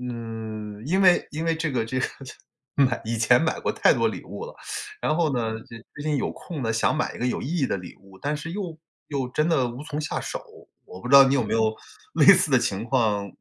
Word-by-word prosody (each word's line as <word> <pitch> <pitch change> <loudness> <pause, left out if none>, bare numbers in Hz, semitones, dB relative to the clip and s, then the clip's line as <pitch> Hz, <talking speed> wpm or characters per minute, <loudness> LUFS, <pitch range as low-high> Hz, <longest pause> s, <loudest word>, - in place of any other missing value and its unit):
嗯， 110 -3 -6
因 185 +7 +1
为 180 -2 +5
因 160 +2 -4
为 165 0 +2
这 160 -1 -2
个 120 -4 0
这 130 +3 -2
个 - - +1 0.2
这 130 - -9 0.5
买 130 -2 +2
以 115 +1 -2
前 115 +3 +4
买 160 - 0
过 - - 0
太 - - +4
多 - - +2
礼 - - -6
物 - - -7
了。 485 - -9 0.5
然 155 - +1
后 160 -4 +2
呢， 115 -3 -1
就 115 0 -12 0.2
最 150 - -7
近 150 -1 0
有 135 - -1
空 165 -5 -7
呢， 115 - 0
想 110 +6 +1
买 155 - -1
一 - - -9
个 125 - -1
有 - - -2
意 - - -5
义 135 -5 +1
的 - - 0
礼 90 -2 -9
物， 95 -1 -17
但 145 +1 -1
是 150 +2 -6
又 180 -3 -5 0.3
又 135 -4 -2
真 150 +5 0
的 135 -7 +2
无 125 +5 -8
从 150 -1 -4
下 155 - -3
手。 - - -5 0.4
我 90 - -11
不 125 - -6
知 140 - +4
道 140 0 +11
你 135 +1 +2
有 130 - +2
没 110 0 -2
有 110 -1 +2 0.4
类 - - +3
似 185 -4 +1
的 130 - +6
情 110 -3 -2
况， 110 -6 +1
130 Hz, 280 characters per minute, -25 LUFS, 115-155 Hz, 0.5 s, 道